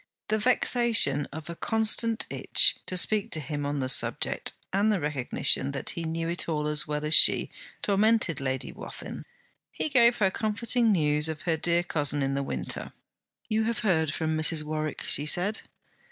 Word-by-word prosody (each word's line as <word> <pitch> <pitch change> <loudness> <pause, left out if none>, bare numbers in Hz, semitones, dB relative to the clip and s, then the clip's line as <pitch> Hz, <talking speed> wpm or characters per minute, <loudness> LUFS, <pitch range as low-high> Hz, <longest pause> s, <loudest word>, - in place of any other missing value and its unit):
The 215 - 0
vexation 230 - +4
of 155 +1 -9
a 170 - -7
constant 225 +2 0
itch - - +3
to 185 - -1
speak 210 +3 +2
to 160 - +2
him 145 0 -5
on 145 -1 -3
the 130 - -2
subject, 130 - 0 0.2
and 205 +3 +2
the 205 - 0
recognition, 140 -1 0
that 135 - -2
he 170 - -5
knew 165 +1 -3
it 170 0 -1
all 150 -2 -2
as 150 0 -1
well 150 0 -3
as 155 - -1
she, - - +5 0.3
tormented 205 -6 +1
Lady 130 -1 -3
Wathin. - - -9 0.5
He - - -3
gave 240 -3 +4
her 190 -3 +1
comforting 225 +3 0
news 150 -4 +1
of 160 +1 -6
her 165 -2 0
dear 170 +2 0
cousin 145 -4 0
in 135 0 -1
the 140 - -2
Winter. 135 - -5 0.5
'You 220 -1 0
have 230 -1 -2
heard 160 -6 +1
from 160 0 -2
Mrs. 155 0 +1
Warwick?' 155 0 -4
she 145 - +2
said. 195 +7 0
165 Hz, 180 wpm, -26 LUFS, 150-215 Hz, 0.5 s, she